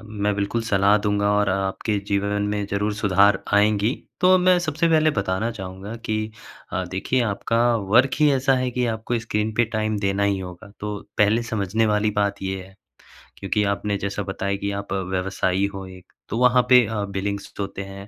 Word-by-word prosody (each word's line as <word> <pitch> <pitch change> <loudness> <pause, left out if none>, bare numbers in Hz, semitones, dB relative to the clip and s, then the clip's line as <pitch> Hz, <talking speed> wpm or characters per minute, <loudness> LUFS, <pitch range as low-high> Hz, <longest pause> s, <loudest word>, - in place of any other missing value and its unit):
अ, - - -15
मैं 105 -1 -2
बिल्कुल 100 +3 -1
सलाह 100 +1 +4
दूँगा 105 0 +1
और 105 0 +2
आपके 95 +2 -1
जीवन 100 0 0
में 105 -1 -1
ज़रूर 105 +1 -1
सुधार 100 -1 +3
आएँगी। 105 +3 +3 0.3
तो 185 +1 +6
मैं 180 0 +4
सबसे 165 0 0
पहले 155 -1 +4
बताना 95 +3 -1
चाहूँगा 95 0 -7
कि 110 - -1 0.6
अ, 95 0 -1
देखिए 100 +7 0
आपका 115 +2 0 0.3
वर्क 130 +3 +5
ही 150 -1 +5
ऐसा 135 0 +2
है 125 - -1
कि 125 0 -1
आपको 115 +2 -2
स्क्रीन 110 -1 -2
पे 120 - +3
टाइम 110 -1 0
देना 100 0 0
ही 100 -1 +1
होगा 90 +2 -9
तो 105 0 -3 0.2
पहले 105 +3 +3
समझने 110 +2 +1
वाली 105 0 +1
बात 100 -1 -1
ये 95 0 -3
है। 95 +1 -16 0.6
क्योंकि 105 +2 0
आपने 100 0 -1
जैसा 100 +1 -3
बताया 100 0 -3
कि 100 0 -3
आप 100 0 -5
व्यवसायी 95 0 -1
हो 95 -1 -6
एक, 95 -1 -14 0.2
तो 110 - -2
वहाँ 125 0 +5
पे 125 -2 +7
अ, 105 -2 -2
बिलिंग्स 100 +1 -4
तो 100 - -1
होते 100 0 -6
हैं। 100 +1 -10
105 Hz, 195 wpm, -23 LUFS, 100-110 Hz, 0.6 s, पे